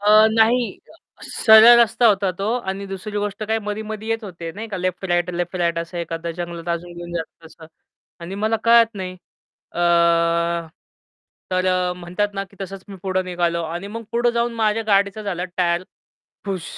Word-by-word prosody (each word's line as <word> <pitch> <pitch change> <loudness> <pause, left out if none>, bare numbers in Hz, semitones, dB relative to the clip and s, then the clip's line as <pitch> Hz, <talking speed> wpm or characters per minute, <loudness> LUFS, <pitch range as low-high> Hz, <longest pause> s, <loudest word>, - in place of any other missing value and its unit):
अ, 215 +1 +6
नाही 230 +2 +2 0.5
सरळ 220 +2 +7
रस्ता 235 +1 +3
होता 200 -2 +3
तो 195 - -2
आणि 195 -3 -5
दुसरी 195 +2 -5
गोष्ट 205 +1 -3
काय 220 +1 0
मध्ये-मध्ये 215 +1 -5
येत 225 0 -1
होते 170 -4 -7
नाही 220 +4 -7
का 195 - -4
लेफ्ट-राइट, 180 -1 -1
लेफ्ट-राइट 175 -1 -1
असं 170 +1 -5
एखादं 170 0 -4
जंगलात 170 -1 -6
अजून 175 +1 -8
घेऊन 175 0 -8
जातो 165 0 -6
तसं 160 0 -15 0.5
आणि 175 +3 -7
मला 225 +1 +2
कळत 230 -1 +5
नाही 185 -2 -5 0.6
अ, - - -7 1.7
तर 185 0 0
अ, 180 -1 +1
म्हणतात 180 +4 -2
ना 195 - -2
की 200 - -20
तसंच 195 0 -7
मी 195 - -9
पुढे 185 -1 0
निघालो 175 -2 -1
आणि 170 +4 -5
मग 230 - -5
पुढं 240 +1 +2
जाऊन 235 0 0
माझ्या 220 0 +1
गाडीचा 200 +1 +2
झालं 180 -3 -3
टायर 175 0 +1 0.6
पुश! 190 -4 -3
195 Hz, 170 wpm, -21 LUFS, 175-215 Hz, 1.7 s, सरळ